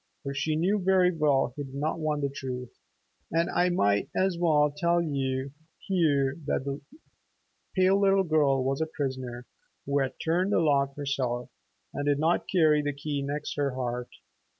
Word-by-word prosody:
For 140 -1 -4
she 155 +3 -1
knew 190 +6 +1
very 185 -1 +4
well 145 -5 +2
he 145 - -4
did 135 -1 -10
not 155 +4 -2
want 150 -2 -1
the 140 - +1
truth. 125 -3 -6 0.6
And 165 +1 +1
I 180 +1 +2
might 100 - +1
as 190 -1 +1
well 155 -4 +3
tell 170 +3 +2
you 135 -4 -2 0.3
here 145 -7 +1
that 135 - -1
that 140 0 -4 0.9
pale 190 +1 +4
little 195 -1 +4
girl 145 -5 +2
was 135 +3 -1
a 160 - 0
prisoner 130 -5 -4 0.4
who 140 +1 +1
had 135 -1 -1
not - - -41
turned 180 +5 +1
the - - +4
lock 140 -4 +2
herself, 130 -4 -2 0.4
and 145 - -3
did 145 -1 +3
not 160 +4 +1
carry 155 -5 +4
the 145 0 -2
key 145 0 -3
next 145 +2 -3
her 140 -3 0
heart. 125 -1 -3
145 Hz, 175 wpm, -28 LUFS, 135-165 Hz, 0.9 s, very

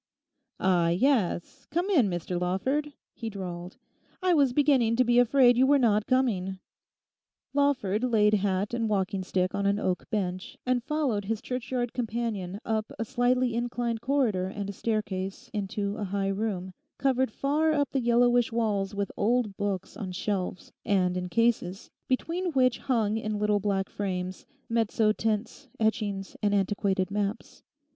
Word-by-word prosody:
'Ah, 180 -3 +3
yes, 190 -2 0
come 345 +5 0
in, 265 - +4
Mr 175 0 -3
Lawford,' 260 +12 0 0.2
he 230 -2 -5
drawled; 180 -3 -7 0.5
'I 365 -1 +4
was 280 -5 +4
beginning 260 -4 +3
to 255 - +4
be 240 0 +4
afraid 245 0 +5
you 260 - +5
were 285 +1 +5
not 215 -5 +2
coming.' 210 -8 +1 1.0
Lawford 260 -7 +1
laid 215 -4 +3
hat 200 +1 0
and 230 -2 0
walking 195 -1 0
stick 185 0 0
on 200 0 0
an 200 0 +2
oak 185 -3 -2
bench, 185 -4 -3
and 250 -1 +1
followed 275 -8 -1
his 220 +1 -1
churchyard 250 -1 -3
companion 225 -5 -3
up 220 -1 -1
a 225 - -2
slightly 250 0 +1
inclined 235 -1 -2
corridor 235 -9 +1
and 200 +1 -4
a - - -11
staircase 210 +1 -3
into 205 0 -2
a 210 - -3
high 195 0 -1
room, 195 -2 -2 0.2
covered 260 -2 +2
far 295 +7 +1
up 290 -2 +1
the 270 - 0
yellowish 240 0 +3
walls 205 -3 0
with 200 -1 -2
old 225 -1 +1
books 195 -2 -3
on 190 -3 -5
shelves 185 0 -3
and 180 -3 +2
in 180 0 -3
cases, 230 -3 0 0.2
between 335 +7 -1
which 255 -2 +3
hung 220 -5 +1
in 215 -1 -2
little 210 0 +2
black 195 -1 0
frames, 185 -2 -4 0.2
mezzo 225 -2 +2
tints, 220 +6 -2
etchings, 210 -3 -1
and 205 -1 +2
antiquated 195 -1 0
maps. 205 0 -3
215 Hz, 155 wpm, -28 LUFS, 195-245 Hz, 1.0 s, afraid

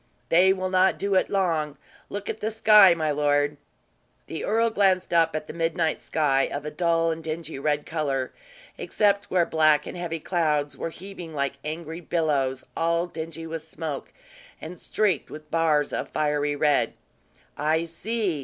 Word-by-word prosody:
"They 180 +3 +5
will 185 -1 -1
not 185 0 +3
do 200 0 -1
it 185 - +2
long. 165 -7 0 0.3
Look 205 0 -5
at 220 - -4
the 215 - -1
sky, 210 -4 +7
my 155 -2 0
lord." 145 0 +1 0.7
The 160 - -6
earl 230 +2 +2
glanced 190 -4 +2
up 165 -2 +3
at 155 - -3
the - - -8
midnight 165 -1 0
sky, 135 -4 +1
of 145 +1 -4
a 150 - -4
dull 165 0 +1
and 160 0 -5
dingy 160 -2 -5
red 150 +1 0
color, 140 -5 -2 0.5
except 200 -1 +1
where 180 -2 +3
black 155 -2 +3
and - - -7
heavy 170 -2 -4
clouds 150 -4 0
were - - -4
heaving 175 -2 -9
like 140 -1 -2
angry 160 +2 -5
billows, 145 -6 0
all 170 +1 +1
dingy 165 -1 -7
with 165 0 -5
smoke 160 -2 -6 0.5
and 165 +2 -9
streaked 200 -8 0
with 155 0 -11
bars 155 -3 +2
of - - -3
fiery 150 -1 0
red. 145 -1 +2 0.6
"I 155 +2 +1
see! 185 +1 -2
165 Hz, 165 wpm, -25 LUFS, 150-180 Hz, 0.7 s, sky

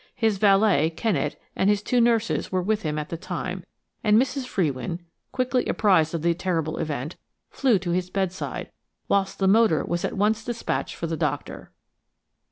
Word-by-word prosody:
His 220 -4 +1
valet, 195 -6 +4
Kennet, 165 -2 -1 0.2
and 195 - +2
his 205 0 +2
two 245 +2 +2
nurses 230 -1 +1
were 185 -1 0
with 215 +2 0
him 155 -1 -2
at 150 0 -4
the 165 - -4
time, 180 +1 -5 0.4
and 210 0 +5
Mrs. 265 0 -1
Frewin, 155 - -2 0.3
quickly 255 -1 0
apprised 175 -6 +3
of 160 - -3
the 170 0 +3
terrible 165 -3 -2
event, 150 -1 -4 0.3
flew 255 -6 +3
to 180 -1 -3
his 180 +1 -1
bedside, 190 -1 -3 0.4
whilst 195 -1 +1
the 190 - +1
motor 205 -5 +4
was 175 +1 -2
at - - -2
once 215 +2 +1
despatched 235 0 -3
for - - -4
the 165 0 -2
doctor. 145 -3 -3
190 Hz, 175 wpm, -25 LUFS, 165-215 Hz, 0.4 s, and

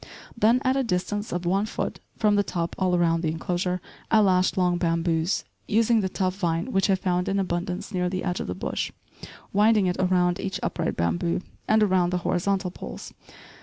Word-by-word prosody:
Then, 230 +2 +3
at 260 0 +2
a 270 - +1
distance 205 0 -2
of 175 0 -3
one 195 +4 +1
foot - - -3 0.2
from 210 -2 +3
the 205 - +4
top 170 -4 -3
all 185 -1 +2
around 165 -1 +2
the 160 - 0
enclosure, 180 +3 -1 0.3
I 220 - +5
lashed 185 -2 +3
long 180 -1 +2
bamboos, 165 +1 0 0.2
using 225 +1 +3
the 190 - -1
tough 185 0 -1
vine 170 +5 -1
which 195 -1 +2
I 195 - +5
found 180 -1 -1
in 195 - 0
abundance 180 +2 -3
near 180 -1 0
the 185 0 -3
edge 180 -1 -1
of - - -4
the 90 - -3
bush, 95 - -3 0.6
winding 210 0 +4
it 180 -1 0
around 180 -1 +2
each 195 -1 -3
upright - - -2
bamboo, 85 - 0 0.3
and 215 0 +4
around 185 -3 +3
the 180 - 0
horizontal 190 +1 0
poles. - - -8
185 Hz, 195 wpm, -25 LUFS, 175-205 Hz, 0.6 s, I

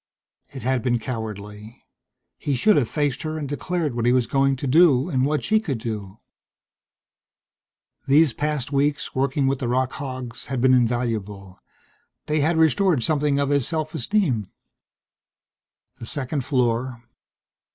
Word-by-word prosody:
It 130 -4 -8
had 130 0 0
been 120 -1 +1
cowardly 110 -2 -7 0.5
he 140 - -1
should 210 - +4
have 125 -6 +1
faced 145 -3 -1
her 155 0 -4
and 150 -2 -4
declared 155 +1 -2
what 120 0 -1
he - - +5
was 125 -1 +3
going 135 +2 +2
to 130 - -6
do 140 -1 +4
and 130 -4 +1
what 150 0 -1
she 220 0 +3
could 150 - -3
do. 110 -4 -6 1.9
These 145 0 +4
past 150 -2 -2
weeks, 145 +2 0
working 135 +1 0
with 135 0 0
the 130 - -2
rock 130 +2 0
hogs, 130 -3 -6
had 135 -2 -3
been 130 +1 +4
invaluable. 110 -6 -1 0.7
They 155 0 0
had 160 +3 +1
restored 160 - +3
something 150 -1 +1
of 140 -1 0
his 140 -4 +1
self 155 -2 -3
esteem. 135 - 0 1.5
The 115 - -6
second 140 0 0
floor. 125 -2 -1
135 Hz, 150 wpm, -23 LUFS, 120-150 Hz, 1.9 s, he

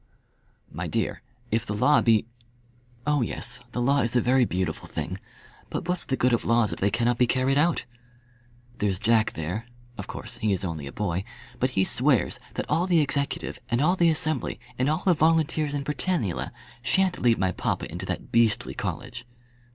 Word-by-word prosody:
"My - - -4
dear, - - -1 0.3
if 110 0 +1
the 105 - -4
law 145 +8 +4
be 110 -2 +3 0.4
" 120 0 -32
"Oh 150 -2 +2
yes, 115 - -3
the 125 - -3
law 140 +3 +3
is 115 +1 +1
a - - +6
very 125 +1 +3
beautiful 90 -5 -2
thing; - - -4 0.5
but - - -4
what's 180 0 -1
the 130 - -1
good 125 0 +3
of 120 - +1
laws 115 -2 +2
if - - -7
they 100 - +2
cannot 120 +3 +1
be 125 - +4
carried 130 +2 +2
out? 170 +3 +2 0.9
There's 100 -3 +1
Jack 110 +2 +2
there; 90 +9 -4 0.3
of 100 - -5
course - - -6
he 105 -2 +1
is 95 0 -1
only 80 -5 -4
a - - -6
boy, 95 -3 -2 0.4
but 130 - +2
he 95 - +5
swears 125 0 +2 0.2
that - - -2
all 175 +3 +1
the 175 -3 +4
executive, 140 -1 0
and 120 - +1
all 165 +6 +3
the 170 -2 +4
Assembly, 155 -3 -1 0.2
and 130 +3 +1
all 155 +3 0
the 185 - +5
volunteers 155 -2 +2
in 140 - -2
Britannula, 145 - -1 0.3
shan't 185 +7 +2
lead 120 -2 +4
my 95 -1 +1
papa - - -2
into - - -6
that - - -4
beastly 115 -3 +3
college." 120 0 -5
120 Hz, 190 wpm, -26 LUFS, 110-150 Hz, 0.9 s, a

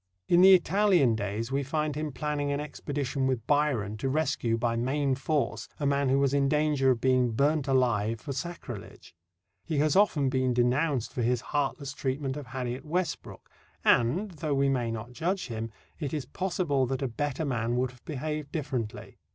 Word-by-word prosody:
In 175 0 +5
the 190 0 +9
Italian 180 - +3
days 110 +3 -3
we 140 +1 +1
find 150 +2 -1
him 155 0 -3
planning 145 +1 -2
an 140 - -1
expedition 140 -2 -3
with 125 -4 -1
Byron 130 -8 +1
to 135 - -2
rescue, 140 -6 0
by 115 0 0
main 135 +4 0
force, 145 +2 -1
a 145 - -1
man 140 -1 +2
who 135 - +3
was 140 -1 +2
in 140 -1 +2
danger 150 -3 +2
of 125 -3 +2
being 130 -1 +2
burnt 145 +3 +1
alive 115 -4 +2
for 140 - -5
sacrilege. 130 - -7 0.5
He 160 -3 -2
has 155 +4 +2
often 175 -9 +4
been 130 -1 +1
denounced 125 +1 +1
for 125 - -2
his 120 +1 +1
heartless 140 -1 -1
treatment 135 -1 -2
of 145 -3 -7
Harriet 125 +1 -4
Westbrook, 175 +3 -3 0.4
and, 155 - +3
though 155 -3 -2
we 140 0 +2
may 125 -3 0
not 115 +1 -5
judge 175 +2 -2
him, 115 0 -4 0.3
it 150 -2 -3
is 145 -4 -3
possible 150 -4 0
that 135 +2 -2
a - - +1
better 145 +5 -2
man 120 -3 -1
would 125 0 0
have 125 -1 -20
behaved 150 0 -4
differently. 130 -8 -4
135 Hz, 185 wpm, -28 LUFS, 125-150 Hz, 0.5 s, the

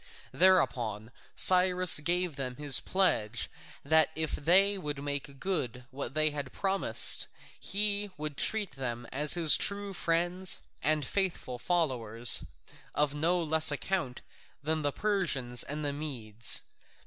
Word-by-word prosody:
Thereupon 120 - 0 0.2
Cyrus 180 -2 +5
gave 175 +1 -2
them 130 -2 -6
his 145 -2 +5
pledge 120 - -1 0.3
that 160 +2 +3
if 160 -1 -2
they 190 +6 +3
would 145 -6 -6
make 140 -1 -6
good 130 -10 -4
what 135 0 -7
they 155 0 +2
promised 190 +9 +2 0.3
he 205 0 -2
would 150 -1 -6
treat 215 +3 -1
them 120 -2 -6
as 150 +4 +3
his 165 -3 +7
true 200 -1 -2
friends 175 +2 0 0.2
and 150 -1 0
faithful 170 -9 -4
followers, 120 -9 +1 0.5
of 145 -1 0
no 170 +4 -1
less 160 0 +6
account 145 -4 -4 0.4
than 155 +1 -2
the 145 -1 -2
Persians 145 -12 -1
and 150 +1 -3
the 145 - -3
Medes. 120 -7 -1
150 Hz, 125 wpm, -29 LUFS, 135-180 Hz, 0.5 s, his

